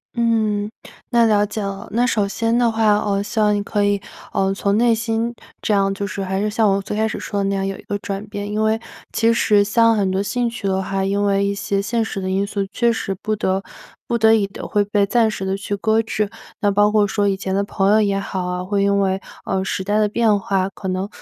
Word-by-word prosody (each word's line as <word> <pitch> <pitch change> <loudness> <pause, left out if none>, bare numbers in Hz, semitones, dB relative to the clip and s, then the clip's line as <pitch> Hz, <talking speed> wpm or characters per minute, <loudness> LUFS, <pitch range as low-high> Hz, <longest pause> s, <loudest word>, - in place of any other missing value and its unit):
嗯， 220 -3 +1 0.4
那 235 -2 +4
了 210 -2 +3
解 215 +1 -5
了。 195 0 -5
那 240 +3 +2
首 210 -4 +1
先 225 +3 0
的 240 -2 +3
话， 220 -2 +3
哦， 200 -1 0
希 215 +2 -3
望 210 -1 +4
你 205 - 0
可 205 0 -1
以， 205 -1 +1 0.3
嗯， 195 0 +1
从 200 0 0
内 235 0 +4
心 230 +1 -1 0.3
这 210 - 0
样 195 -1 +2
就 200 0 -3
是 195 0 -4
还 190 +1 -2
是 210 - 0
像 220 +1 +2
我 195 - 0
最 210 +1 -5
开 220 - +2
始 220 - -4
说 200 -1 -3
的 - - 0
那 195 - 0
样 195 0 -1
有 195 - -4
一 - - -12
个 205 - -3
转 200 +1 -5
变。 205 0 -5
因 215 +1 0
为 220 +1 +2 0.3
其 230 0 +3
实 210 -3 +4
像 230 +2 +3
很 195 -2 +1
多 190 +1 0
兴 240 +3 -1
趣 230 -4 -5
的 190 0 +1
话， 195 0 -2
因 200 +1 0
为 200 0 +2
一 200 - 0
些 200 0 -1
现 225 +3 0
实 220 - -4
的 185 - -3
因 195 +1 +1
素， 200 -2 -2
确 235 +3 +2
实 210 -4 -2
不 215 0 -1
得 190 -1 -1 0.4
不 235 - +1
得 220 0 +5
已 205 -3 +2
地 195 - -9
会 205 -1 +2
被 205 0 +1
暂 225 +2 +3
时 195 -3 -4
地 190 - 0
去 205 +1 -3
搁 220 +2 +2
置， 215 -2 -2 0.3
那 205 -1 +3
包 205 +1 +4
括 210 -1 +4
说 205 0 0
以 195 -1 +1
前 190 -1 -3
的 200 +1 +1
朋 200 0 +1
友 215 +1 +5
也 200 -2 +1
好 190 -2 -3
啊， 180 0 -3
会 200 +2 0
因 200 0 +2
为， 190 0 0 0.2
嗯， 190 0 -1
时 190 0 -2
代 205 +2 +1
的 210 - +3
变 215 -2 +2
化， 190 -1 0
可 190 0 -8
能 185 +1 -1
205 Hz, 280 characters per minute, -20 LUFS, 195-220 Hz, 0.4 s, 得